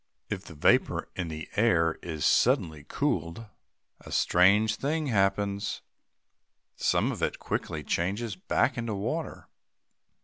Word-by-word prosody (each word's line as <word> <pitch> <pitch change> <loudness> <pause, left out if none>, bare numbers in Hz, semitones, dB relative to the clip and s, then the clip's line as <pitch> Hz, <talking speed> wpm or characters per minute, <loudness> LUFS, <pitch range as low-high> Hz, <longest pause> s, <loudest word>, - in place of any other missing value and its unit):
If 100 -1 -4
the 80 - -11
vapor 75 - +2
in 90 -2 -3
the 80 -1 -6
air 85 -7 +2
is 80 -3 -3
suddenly 80 -3 +2
cooled, 105 - -2 0.5
a - - -12
strange 105 +5 +4
thing 155 +3 -1
happens. 100 -2 0 0.9
Some - - +1
of - - -6
it - - 0
quickly - - -3
changes 100 +5 -1
back 90 - 0
into 115 -3 -3
water. 100 - -4
100 Hz, 125 wpm, -28 LUFS, 85-110 Hz, 0.9 s, strange